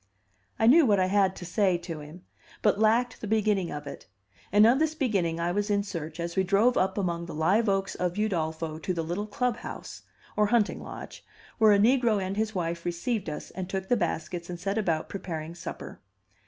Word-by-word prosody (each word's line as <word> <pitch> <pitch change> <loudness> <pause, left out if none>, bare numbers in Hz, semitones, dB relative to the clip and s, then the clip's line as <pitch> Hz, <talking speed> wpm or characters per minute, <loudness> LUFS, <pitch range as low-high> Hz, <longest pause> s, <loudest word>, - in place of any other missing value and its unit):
I 225 - +2
knew 305 +8 +7
what 205 -3 +4
I 185 - +3
had 190 0 +2
to 175 - -8
say 185 0 +2
to 170 -2 -7
him, 155 +5 -11 0.4
but 210 -1 +3
lacked 230 +3 +2
the 215 - -4
beginning 210 -4 +1
of 150 0 -6
it; 140 - -9 0.4
and 205 +2 +6
of 245 +4 +5
this 315 0 +1
beginning 190 - 0
I 170 +1 0
was 205 +3 -1
in 200 -1 +2
search 165 -5 -6
as 170 0 -3
we 190 - +3
drove 205 +6 +3
up 190 +1 +1
among 170 -3 -2
the 170 - -7
live 195 +8 +2
oaks 195 0 0
of 180 -1 -2
Udolpho 160 -6 -2
to 185 - -1
the 165 - -1
little 175 +6 -3
club 245 +1 -1
house, - - -8 0.3
or 210 0 +3
hunting 230 -2 +1
lodge, - - -9 0.4
where 220 -1 +6
a 205 - +6
negro 230 0 +3
and 190 0 -3
his 220 0 -1
wife 170 -1 -2
received 175 +3 -2
us, 150 - -7
and 185 -1 -6
took 190 0 -4
the 245 - +4
baskets 170 -2 -3
and 175 -1 -5
set 195 +4 -1
about 165 -6 0
preparing 165 -4 -5
supper. 175 - -8
190 Hz, 210 wpm, -28 LUFS, 170-215 Hz, 0.4 s, knew